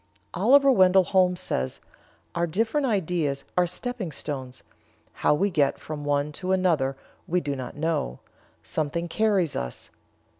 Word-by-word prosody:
Oliver 275 Hz, +1 st, +5 dB
Wendell 190 Hz, -4 st, +5 dB
Holmes 180 Hz, 0 st, +2 dB
says: 65 Hz, 0 st, -2 dB, 0.5 s
"Our 170 Hz, 0 st, 0 dB
different 225 Hz, -, 0 dB
ideas 170 Hz, -, -1 dB
are 180 Hz, 0 st, +3 dB
stepping 200 Hz, -1 st, -4 dB
stones; 135 Hz, -3 st, -6 dB, 0.5 s
how -, -, +2 dB
we 195 Hz, +6 st, +1 dB
get 145 Hz, -5 st, +2 dB
from 150 Hz, -1 st, -7 dB
one 145 Hz, +1 st, 0 dB
to 185 Hz, 0 st, -1 dB
another 160 Hz, -8 st, +1 dB, 0.3 s
we 180 Hz, +2 st, +1 dB
do 145 Hz, -4 st, -3 dB
not 130 Hz, -2 st, -6 dB
know; 150 Hz, -, -1 dB, 0.5 s
something 155 Hz, -, -2 dB
carries 195 Hz, -4 st, +1 dB
us. 60 Hz, -1 st, -5 dB
170 Hz, 140 wpm, -26 LUFS, 145-190 Hz, 0.5 s, Oliver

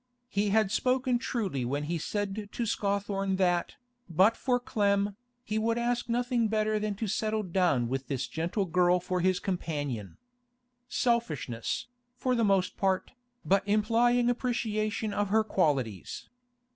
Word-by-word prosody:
He 205 Hz, -1 st, 0 dB
had 215 Hz, -1 st, +3 dB
spoken 255 Hz, +1 st, +1 dB
truly 205 Hz, -, -2 dB
when 140 Hz, +4 st, -1 dB
he 165 Hz, +3 st, -2 dB
said 205 Hz, +3 st, -3 dB
to 235 Hz, -, -2 dB
Scawthorne 200 Hz, -2 st, -1 dB
that, 180 Hz, -2 st, +1 dB, 0.3 s
but 190 Hz, +7 st, +4 dB
for 250 Hz, -2 st, +1 dB
Clem, 200 Hz, -3 st, +1 dB, 0.3 s
he 215 Hz, -2 st, -1 dB
would 230 Hz, +1 st, +1 dB
ask 240 Hz, 0 st, -1 dB
nothing 240 Hz, -1 st, +1 dB
better 215 Hz, 0 st, +1 dB
than 210 Hz, -1 st, -2 dB
to 220 Hz, -, -3 dB
settle 215 Hz, +2 st, 0 dB
down 175 Hz, -, +1 dB
with 135 Hz, +2 st, -3 dB
this 130 Hz, -3 st, -2 dB
gentle 170 Hz, -, -1 dB
girl 180 Hz, +1 st, +3 dB
for 180 Hz, +1 st, -2 dB
his 185 Hz, 0 st, +2 dB
companion. 145 Hz, -, -3 dB, 0.7 s
Selfishness, 160 Hz, -, -1 dB, 0.3 s
for 255 Hz, 0 st, 0 dB
the 235 Hz, -2 st, +2 dB
most 195 Hz, -3 st, +2 dB
part, 190 Hz, -1 st, 0 dB, 0.3 s
but 195 Hz, +1 st, +4 dB
implying 230 Hz, +4 st, +3 dB
appreciation 220 Hz, -3 st, -1 dB
of 205 Hz, -1 st, 0 dB
her 220 Hz, +2 st, +4 dB
qualities. 135 Hz, -, -1 dB
200 Hz, 145 wpm, -29 LUFS, 175-225 Hz, 0.7 s, but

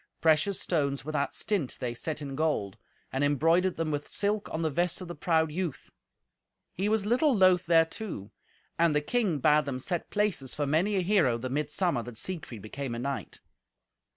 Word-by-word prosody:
Precious 160 Hz, +5 st, +3 dB
stones 140 Hz, -5 st, -1 dB
without 150 Hz, -2 st, -1 dB
stint 195 Hz, -11 st, -2 dB
they 120 Hz, -2 st, -2 dB
set 150 Hz, +5 st, -4 dB
in 135 Hz, -1 st, -5 dB
gold, 145 Hz, -11 st, 0 dB, 0.4 s
and 135 Hz, +2 st, 0 dB
embroidered 165 Hz, +6 st, +2 dB
them 160 Hz, -1 st, -1 dB
with 145 Hz, 0 st, -3 dB
silk 205 Hz, +1 st, -1 dB
on 160 Hz, -, -2 dB
the 160 Hz, -, 0 dB
vest 175 Hz, +4 st, 0 dB
of 185 Hz, -, -7 dB
the 175 Hz, -, -5 dB
proud 160 Hz, 0 st, +1 dB
youth. 170 Hz, -3 st, -4 dB, 0.8 s
He 195 Hz, +3 st, -1 dB
was 215 Hz, -2 st, +1 dB
little 250 Hz, +3 st, +3 dB
loth 185 Hz, -2 st, +4 dB
thereto. 165 Hz, -, +1 dB, 0.5 s
And 165 Hz, -3 st, +4 dB
the 150 Hz, -, +3 dB
king 200 Hz, -1 st, 0 dB
bade 150 Hz, +2 st, +4 dB
them 135 Hz, -3 st, -3 dB
set 170 Hz, +6 st, -3 dB
places 205 Hz, -11 st, 0 dB
for 145 Hz, -, -1 dB
many 165 Hz, +9 st, +1 dB
a 190 Hz, -, +2 dB
hero 175 Hz, -, +3 dB
the 125 Hz, +2 st, -5 dB
mid 150 Hz, +1 st, -1 dB
summer 170 Hz, -5 st, 0 dB
that 120 Hz, -1 st, -9 dB
Siegfried 145 Hz, -, -4 dB
became 125 Hz, +3 st, -5 dB
a -, -, -4 dB
knight. 135 Hz, +1 st, -4 dB
160 Hz, 185 wpm, -29 LUFS, 140-185 Hz, 0.8 s, loth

